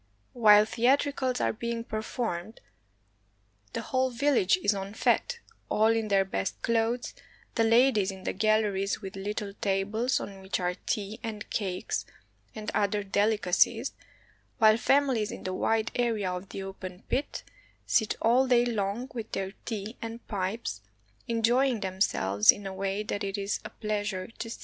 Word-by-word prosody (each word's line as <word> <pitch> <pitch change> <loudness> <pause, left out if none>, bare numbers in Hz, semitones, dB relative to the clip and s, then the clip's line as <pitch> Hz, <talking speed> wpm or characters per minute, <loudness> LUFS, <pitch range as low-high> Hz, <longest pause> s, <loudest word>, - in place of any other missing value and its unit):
While 210 -3 +7
theatricals 255 +2 +1
are - - +1
being 235 +1 -3
performed, 220 -3 -4 1.1
the - - -2
whole 260 +1 +1
vil 280 +4 +1
lage 190 -7 +4
is 205 +1 +4
en 195 +1 -5
fete, 475 - +1 0.3
all 220 +1 +4
in 225 -1 -1
their 195 -2 +3
best 100 - -3
clothes, 230 +1 0 0.4
the 230 - +2
ladies 225 -3 +4
in 190 -1 -7
the - - -2
galleries 210 -1 +1
with 190 - -6
httle 200 +1 -4
tables 205 +5 +1
on 195 -1 -8
which 190 +1 -2
are 180 0 0
tea 210 +1 -2
and 220 -2 -5
cakes 185 -4 -2 0.5
and 215 -1 -4
other 205 0 +1
delicacies, 205 -1 +2 0.6
while 220 -1 +7
famihes 250 -2 +2
in - - -8
the 185 - -3
wide 220 +3 +1
area 225 -6 0
of 180 +2 -6
the 195 - -6
open 190 0 -8
pit 270 +3 -2 0.4
sit 220 -2 +2
all 250 +4 +4
day 245 -1 +4
long 220 +1 -1
with 230 -2 -6
their 190 0 -2
tea 220 0 -5
and 230 +1 -7
pipes, 190 - -3 0.5
enjoying 235 +1 +2
themselves 145 - +3
in 200 - -9
a 195 - -4
way 195 +2 -2
that 205 0 -3
it 195 +1 -2
is 200 +1 -2
a - - -7
pleasure 205 -3 -3
to 230 - -4
see. - - -7
215 Hz, 160 wpm, -28 LUFS, 195-230 Hz, 1.1 s, While